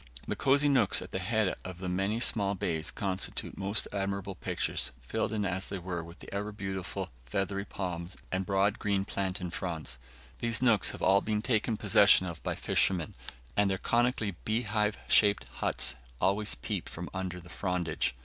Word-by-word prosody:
The - - -1
cosy 140 +2 +3
nooks 130 -8 +4
at - - -11
the 95 - -2
head 105 +1 +1
of 95 -2 -7
the 90 +1 -5
many 95 +5 0
small 100 -4 +2
bays 80 -4 -1
constitute 95 -2 -2
most 100 +2 +1
admirable 100 0 -2
pictures, 90 - -1
filled 65 - -2
in 105 -2 0
as 95 0 -2
they 100 - -4
are 90 -1 -4
with 85 +2 -11
the - - -11
ever 105 +1 -2
beautiful 95 -2 -4 0.2
feathery 100 +7 -1
palms 90 -2 -5
and 95 +1 0
broad 100 +3 +2
green 100 -2 0
plantain 95 -3 -3
fronds. 80 -9 -4 0.4
These 115 -1 +1
nooks 115 -5 +4
have - - -6
all 100 +1 +5
been 105 0 -1
taken 110 -2 +1
possession 95 - +6
of 85 -3 -6
by - - -2
fishermen, 90 -5 +2 0.4
and 105 -1 +3
their 95 - 0
conically 120 -1 +1
beehive 105 -2 +1
shaped 100 -2 +5
huts - - +2 0.3
always 100 +3 +2
peep - - -3
from 90 +1 -6
under 95 -1 -3
the 90 0 -14
frondage. 85 -9 -1
95 Hz, 175 wpm, -31 LUFS, 90-105 Hz, 0.4 s, possession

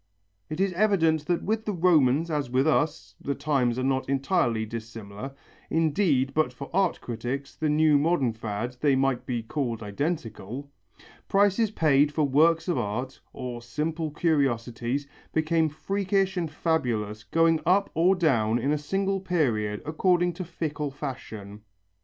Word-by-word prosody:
It 155 - -5
is 195 -1 +1
evident 165 -6 +2
that 175 -1 0
with 220 +1 -1
the 210 - -1
Romans 160 -3 +3
as 145 -4 -1
with 130 +2 +2
us 155 0 0
the 140 - -2
times 135 -5 0
are 130 - -1
not 130 0 0
entirely 135 -5 +1
dissimilar; 115 +2 -7 0.3
indeed 155 -4 +2
but 155 -4 +1
for 135 +2 -9
art 190 -1 +2
critics, 125 +4 -5
the 155 -1 -1
new 150 -1 +4
modern 145 -6 +1
fad, 110 +2 -4
they 145 -3 +4
might 135 -2 0
be 120 -3 -2
called 115 -3 -3
identical 130 - -4 0.6
prices 205 +2 +3
paid 150 -6 +3
for 150 +1 0
works 160 +4 +3
of 170 -7 +1
art, 125 +4 -4
or 120 -2 -6
simple 155 +7 -3
curiosities, 135 -4 0 0.3
became 160 0 +2
freakish 195 +4 -1
and 170 -3 -1
fabulous, 120 -10 -1
going 165 -1 +2
up 195 +4 +2
or 175 +4 +4
down 120 - +2
in 135 +4 0
a 150 - +1
single 195 +5 -1
period 120 - 0
according 175 +3 +2
to 185 - -5
fickle 155 -4 -3
fashion. 115 -8 -7
145 Hz, 150 wpm, -26 LUFS, 125-165 Hz, 0.6 s, new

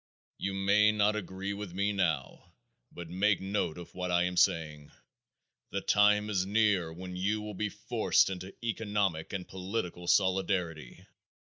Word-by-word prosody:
You 95 0 -2
may 100 +2 +4
not 105 0 +2
agree 95 0 -4
with 100 -3 -7
me 100 +2 +1
now, 85 -2 -2 0.4
but 85 -1 -8
make 95 +4 +2
note 95 -4 -2
of 85 - -10
what 90 0 -3
I 85 0 +3
am 90 0 -2
saying. 80 -4 +1 0.8
The 100 - -3
time 105 +1 +4
is 95 -3 +1
near 100 -4 +2
when 90 +2 -8
you 100 +4 0
will 105 0 -6
be 105 +2 -2
forced 105 -1 +1
into 95 +1 -7
economic 100 -7 -1
and 95 -3 -5
political 90 -2 -4
solidarity. 90 -7 0
95 Hz, 150 wpm, -30 LUFS, 90-105 Hz, 0.8 s, may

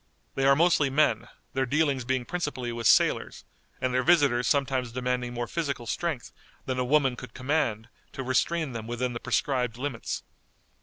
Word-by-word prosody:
They 135 0 +1
are 140 - +6
mostly 160 -3 +3
men, 150 +3 +2 0.3
their 135 -1 0
dealings 140 -2 +1
being 130 -1 -1
principally 145 -8 -3
with 115 -1 -1
sailors, - - +3 0.3
and 130 -1 -1
their 130 - +3
visitors 140 -6 +3
sometimes 135 -4 +1
demanding 125 0 -2
more 120 0 -3
physical 140 -5 -3
strength 145 +2 -3 0.3
than 130 -1 -2
a - - +2
woman 135 -1 +2
could 120 -1 -10
command 130 -5 -1 0.3
to 135 - -5
restrain 150 +4 0
them 115 -2 -6
within 120 +1 -2
the 120 - -4
prescribed 125 -4 0
limits. 130 -3 -4
130 Hz, 165 wpm, -27 LUFS, 120-145 Hz, 0.3 s, are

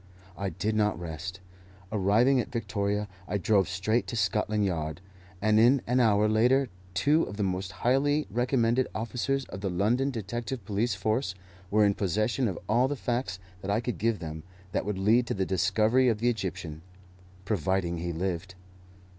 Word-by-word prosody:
I 100 0 -2
did 95 +6 -2
not 105 -5 +1
rest. 85 +3 -6 0.5
Arriving 110 +6 +3
at 120 - -3
Victoria, 105 -3 -1 0.2
I 105 - -1
drove 100 -1 +2
straight 100 +6 0
to - - -4
Scotland 105 0 +1
Yard, 80 -3 -2 0.4
and 110 0 +4
in 125 +4 +5
an 125 +2 +2
hour 105 -3 +4
later 125 +5 +3 0.3
two 145 - +3
of 100 - -8
the 105 - 0
most 95 -1 -2
highly 145 +4 +3
recommended 120 +1 +2
officers 125 +4 -1
of 95 - -7
the 100 - -1
London 110 +10 +1
detective 120 0 -4
police 105 +2 0
force 110 +1 -1 0.3
were 105 0 +4
in 100 - +3
possession 110 +6 0
of 95 - -3
all 120 +4 +3
the 145 - -2
facts 120 -7 -2 0.2
that 95 - -5
I 105 +2 +2
could 120 0 -4
give 115 0 +1
them 80 -3 -6 0.3
that - - -1
would 105 -2 -2
lead 110 +5 +3
to - - -1
the 95 -1 0
discovery 110 +7 +2
of 110 - +1
the 120 +3 +2
Egyptian, 90 -7 -5 0.6
providing 95 -3 0
he 85 +1 -3
lived. 90 +2 -3
105 Hz, 170 wpm, -28 LUFS, 95-120 Hz, 0.6 s, in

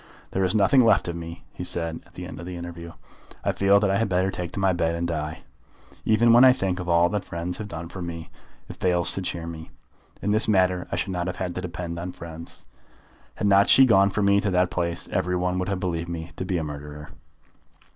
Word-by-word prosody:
"There 95 - 0
is 95 +3 +1
nothing 110 +6 +5
left 110 -5 +3
of 85 - -3
me," 85 0 -8
he - - -6
said 85 -1 -2
at - - -24
the 90 - -7
end 90 - -8
of 85 - -7
the 90 - -6
interview. 85 -1 -8 0.5
"I - - +1
feel 100 +1 +4
that 100 -1 +1
I 100 - +1
had 115 -2 0
better 95 +1 +1
take 90 -3 -5
to - - -4
my 95 -1 +3
bed 85 -1 0
and 85 0 -2
die. 80 -1 -4 0.6
Even 115 +2 +4
when 120 +2 +8
I 130 -1 +8
think 95 -6 -2
of 90 -1 -5
all 85 0 +4
that 105 -1 -2
friends 85 0 -5
have 105 - -5
done 85 -3 -6
for 90 +2 -8
me, 85 -1 -6 0.4
it - - -10
fails 90 -2 +2
to 95 - -2
cheer 85 -2 -3
me. 80 -1 -8 0.5
In 105 - -1
this 110 +1 +3
matter 90 -3 +2
I - - 0
should 95 - -2
not 90 -1 -2
have 90 - -3
had 90 -1 -3
to 90 - -4
depend 85 -1 -5
on 90 +1 -5
friends. 85 0 -9 0.7
Had - - -3
not 100 0 +5
she 135 - +8
gone 100 -5 +5
for 105 +1 -1
me 100 0 +4
to 105 - 0
that 90 -1 +2
place 85 -1 -2
every 90 -1 0
one 90 0 0
would 90 - -2
have 100 -2 -1
believed 85 -2 -3
me 85 0 -6
to 95 - -4
be 90 -1 -1
a 80 - -2
murderer." 75 0 -8
90 Hz, 245 wpm, -25 LUFS, 85-95 Hz, 0.7 s, when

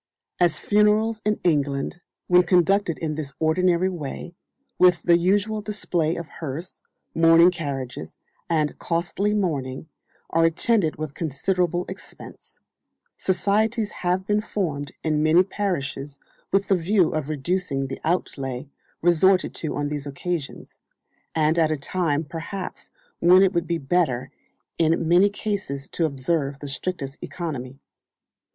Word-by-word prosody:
As 175 -1 +3
funerals 210 +1 +2
in 210 0 0
England, 145 0 0 0.2
when 180 0 +6
conducted 180 -1 +2
in 155 -2 -3
ths 140 -3 -5
ordinary 175 +3 +2
way, 170 -1 -5 0.5
with 180 -3 +5
the 175 - +5
usual 205 +5 +1
display 175 -6 -1
of 170 - -5
hearse, 160 +4 -7 0.3
mourning 165 +2 +6
carriages, 140 -7 -5 0.3
and 155 -3 0
costly 175 +4 -1
mourning, 150 -7 -2 0.4
are 165 +1 +3
attended 165 +1 +2
with 155 -2 -5
considerable 175 +4 -1
expense, 190 +1 -11 0.6
societies 210 +4 +1
have 180 +1 -1
been 210 +1 +1
formed 150 -11 -3
in 155 -1 +1
many 160 +4 +5
parishes 150 -8 -3 0.3
with 195 +1 +2
the 195 - +4
view 180 0 +2
of 155 -2 -3
reducing 150 -1 -1
the 135 - -6
outlay 135 -6 -2 0.4
resorted 180 +2 +4
to 155 - -2
on 145 0 -1
these 145 -1 -4
occasions, 150 +1 -5 0.6
and 160 +1 +2
at 160 -1 +3
a 155 - 0
time 155 +1 -1
perhaps 170 +5 -7 0.3
when 180 +2 +6
it 195 0 +3
would 170 -1 0
be 170 - 0
better 135 -4 0 0.5
in 165 0 +2
many 180 +4 +5
cases 200 -10 -4
to 165 - -1
observe 140 0 -1
the 145 - -8
strictest 140 -1 -3
economy. 135 -7 -5
170 Hz, 130 wpm, -24 LUFS, 150-185 Hz, 0.6 s, when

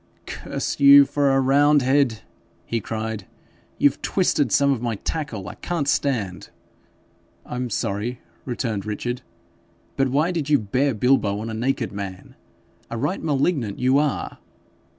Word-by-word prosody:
'Curse - - -4
you 140 0 +9
for 140 0 +1
a 135 0 +3
roundhead!' 135 -3 +3 0.4
he 115 -1 -2
cried; 110 -2 -4 0.5
'you've 145 -1 +2
twisted 145 - +1
some 140 0 +4
of 130 -4 -1
my 120 -2 -1
tackle. 115 -4 -4
I - - -6
can't 165 -5 -3
stand.' 110 - -1 1.0
'I'm 125 0 -4
sorry,' 110 +4 -2 0.2
returned 115 -5 -3
Richard, 120 +4 -4 0.8
'but 135 - +3
why 150 +7 +1
did 160 -5 -3
you 145 - +5
bare 130 +4 0
bilbo 105 -3 +2
on 115 +1 -5
a - - -5
naked 120 +1 -1
man? 100 -2 -7 0.6
A 115 - -4
right 180 +11 -2
malignant 140 - 0
you 130 +3 +3
are 150 -2 -2
130 Hz, 140 wpm, -23 LUFS, 110-140 Hz, 1.0 s, you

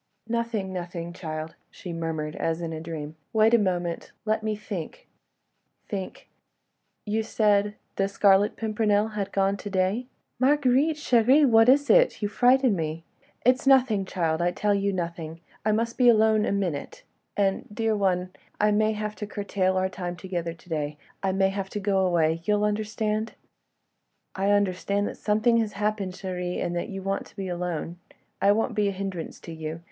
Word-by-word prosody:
"Nothing, 230 -5 -2
nothing, 175 -1 -5
child," 155 -2 -5 0.2
she 180 -3 -8
murmured, 160 -2 -3
as 165 0 -1
in 165 -1 -4
a 160 - -5
dream. 160 -2 -6 0.2
"Wait 220 +1 +4
a 235 - +6
moment... 175 -4 -2
let 220 0 +1
me 215 0 -1
think... 210 - -7 0.8
think!... 195 -3 -6 0.8
You 215 +1 0
said... 210 -2 +2 0.2
the 195 - +2
Scarlet 200 +1 +3
Pimpernel 215 -1 +1
had 205 -2 -4
gone 195 0 +1
to 205 - -7
day.... 195 +6 0 0.2
?" - - -51
"Marguerite, 280 +2 +3
chérie, 260 0 +4
what 225 0 +6
is 285 +2 +5
it? - - +4
You 205 - -1
frighten 250 0 +4
me... 160 -1 -3 0.2
." - - -35
"It 250 - +7
is - - -8
nothing, 250 -7 +5
child, 165 -3 -1
I 175 - +3
tell 205 +3 0
you... 200 0 +1
nothing.... 170 -3 -4 0.2
I 215 - +2
must 230 +3 -1
be 245 -1 +7
alone 220 -1 +4
a - - 0
minute—and—dear 200 - -2
one... 185 -2 0 0.3
I 210 0 +3
may 215 +1 +2
have 210 0 -3
to 210 - -5
curtail 195 -2 -1
our 185 0 +2
time 180 -2 -5
together 170 -1 -4
to 170 - -22
day.... 150 -3 -3 0.2
I 195 - +1
may 190 0 +2
have 195 0 -4
to 210 - -4
go 195 -1 +1
away—you'll 175 +3 +1
understand?" 215 +1 -1 1.0
"I 195 +1 0
understand 200 0 +1
that - - -9
something 220 +3 +2
has 220 -2 0
happened, 205 -2 -1
chérie, 180 -1 -4
and 175 - -2
that 175 - -3
you 195 -2 -6
want 195 +1 -2
to - - -21
be 195 -1 -4
alone. 175 -1 -4 0.4
I 200 - +5
won't 225 +3 +1
be 210 -2 +1
a - - +1
hindrance 190 -3 -5
to 165 - -8
you. 160 0 -5
200 Hz, 175 wpm, -26 LUFS, 180-215 Hz, 1.0 s, It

